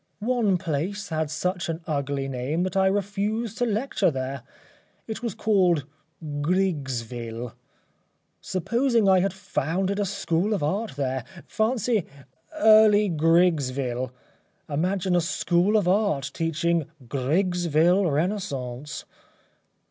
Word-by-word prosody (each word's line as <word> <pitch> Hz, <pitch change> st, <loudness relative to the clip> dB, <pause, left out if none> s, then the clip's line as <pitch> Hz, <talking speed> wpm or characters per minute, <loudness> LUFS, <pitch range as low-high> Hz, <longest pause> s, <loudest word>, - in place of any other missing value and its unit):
One 220 Hz, -4 st, +1 dB
place 185 Hz, +4 st, -3 dB
had 160 Hz, -2 st, -1 dB
such 175 Hz, +3 st, -2 dB
an 165 Hz, +1 st, -3 dB
ugly 140 Hz, -2 st, -2 dB
name 135 Hz, +6 st, -2 dB
that 185 Hz, -1 st, -3 dB
I 190 Hz, 0 st, +4 dB
refused 205 Hz, +3 st, -1 dB
to 245 Hz, -, +2 dB
lecture 215 Hz, -3 st, +1 dB
there. 135 Hz, -2 st, -4 dB, 0.6 s
It 220 Hz, -, -5 dB
was 235 Hz, -5 st, -3 dB
called 180 Hz, -9 st, +2 dB, 0.6 s
Grigsville. 125 Hz, -, -2 dB, 0.9 s
Supposing 230 Hz, +4 st, +1 dB
I 190 Hz, -1 st, +6 dB
had 195 Hz, +2 st, +1 dB
founded 190 Hz, +1 st, -2 dB
a 205 Hz, -, +1 dB
school 195 Hz, +1 st, 0 dB
of 165 Hz, -, -3 dB
Art 185 Hz, +1 st, -1 dB
there 130 Hz, -2 st, -2 dB, 0.2 s
fancy 220 Hz, -2 st, 0 dB, 0.6 s
ŌĆ£Early 210 Hz, -4 st, +6 dB
Grigsville.ŌĆØ 140 Hz, -6 st, -1 dB
Imagine 180 Hz, +4 st, 0 dB
a 175 Hz, -, +4 dB
School 180 Hz, +3 st, +2 dB
of 200 Hz, -4 st, +1 dB
Art 180 Hz, -9 st, +1 dB
teaching 165 Hz, -1 st, 0 dB, 0.2 s
ŌĆ£Grigsville 170 Hz, +5 st, +2 dB
Renaissance. 145 Hz, -5 st, -3 dB
175 Hz, 110 wpm, -25 LUFS, 145-200 Hz, 0.9 s, I